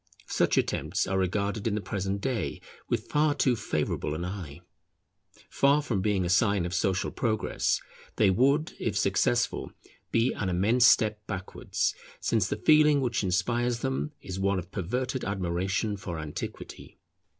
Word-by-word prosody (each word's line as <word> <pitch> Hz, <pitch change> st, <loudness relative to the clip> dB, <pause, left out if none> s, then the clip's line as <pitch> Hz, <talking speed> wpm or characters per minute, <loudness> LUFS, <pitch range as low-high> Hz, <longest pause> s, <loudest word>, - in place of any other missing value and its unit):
Such -, -, +1 dB
attempts 85 Hz, +6 st, 0 dB
are 95 Hz, +1 st, 0 dB
regarded 100 Hz, +3 st, -1 dB
in 105 Hz, -, 0 dB
the -, -, 0 dB
present 100 Hz, -1 st, -3 dB
day 125 Hz, -5 st, -2 dB, 0.3 s
with -, -, -1 dB
far 150 Hz, 0 st, +2 dB
too 130 Hz, -3 st, +2 dB
favourable 75 Hz, -5 st, -2 dB
an 85 Hz, +3 st, -3 dB
eye. 90 Hz, -7 st, -7 dB, 0.9 s
Far 140 Hz, +2 st, +3 dB
from 110 Hz, -9 st, -1 dB
being 100 Hz, -3 st, +1 dB
a -, -, 0 dB
sign 100 Hz, -1 st, +3 dB
of 90 Hz, -, -4 dB
social 95 Hz, +1 st, 0 dB
progress, 110 Hz, -4 st, 0 dB, 0.4 s
they 100 Hz, -3 st, +4 dB
would, 140 Hz, -, +2 dB
if -, -, -1 dB
successful, -, -, +1 dB, 0.4 s
be 115 Hz, +2 st, +2 dB
an 95 Hz, -, -2 dB
immense 110 Hz, +8 st, +4 dB
step 105 Hz, -2 st, +3 dB
backwards; 95 Hz, -3 st, -2 dB, 0.3 s
since 110 Hz, -5 st, +1 dB
the -, -, -1 dB
feeling 150 Hz, -2 st, +5 dB
which 120 Hz, -5 st, 0 dB
inspires 120 Hz, +6 st, 0 dB
them 135 Hz, +3 st, -2 dB
is 95 Hz, -1 st, -5 dB
one 100 Hz, 0 st, +1 dB
of 90 Hz, 0 st, -6 dB
perverted 125 Hz, +7 st, -2 dB
admiration 95 Hz, +2 st, -1 dB
for 90 Hz, -3 st, -5 dB
antiquity. 75 Hz, -2 st, -7 dB
100 Hz, 150 wpm, -28 LUFS, 95-120 Hz, 0.9 s, feeling